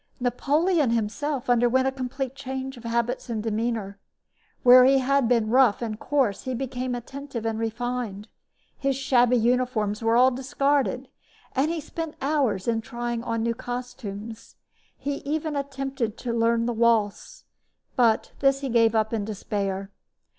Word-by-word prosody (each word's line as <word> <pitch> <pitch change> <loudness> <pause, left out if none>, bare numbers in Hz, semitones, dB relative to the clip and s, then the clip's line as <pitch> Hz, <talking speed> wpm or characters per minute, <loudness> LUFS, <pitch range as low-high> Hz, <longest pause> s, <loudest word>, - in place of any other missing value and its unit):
Napoleon 290 +5 +1
himself 235 +5 -1
underwent 245 +2 +3
a - - +1
complete 265 0 -4
change 265 0 -5
of 240 - -13
habits 235 +2 -1
and 220 -2 -2
demeanor. 220 -2 -2 0.6
Where 250 +1 +9
he 270 +1 +5
had 270 -1 +2
been 230 -2 +2
rough 250 -4 +5
and 220 -2 -4
coarse 265 -9 0
he 260 -1 -2
became 255 0 -3
attentive 260 -1 -7
and 225 -1 -1
refined. 225 -2 -3 0.5
His 275 -1 0
shabby 250 -2 +3
uniforms 235 -3 +1
were 225 0 +2
all 255 +1 +6
discarded, 265 0 0 0.5
and 275 +4 +1
he 335 0 -2
spent 325 +1 -6
hours 265 -9 0
in 225 -1 +1
trying 240 0 -4
on 230 -1 -2
new 230 0 +1
costumes. 230 -3 -7 0.4
He 285 0 -3
even 305 +1 -3
attempted 270 -5 -3
to 240 -2 -3
learn 230 0 +2
to 240 - -1
waltz, 230 - +1 0.5
but 230 -3 +2
this 275 0 +3
he 275 - -3
gave 230 -1 +3
up 220 +1 +1
in 220 -2 0
despair. 200 -1 -3
245 Hz, 150 wpm, -25 LUFS, 225-270 Hz, 0.6 s, Where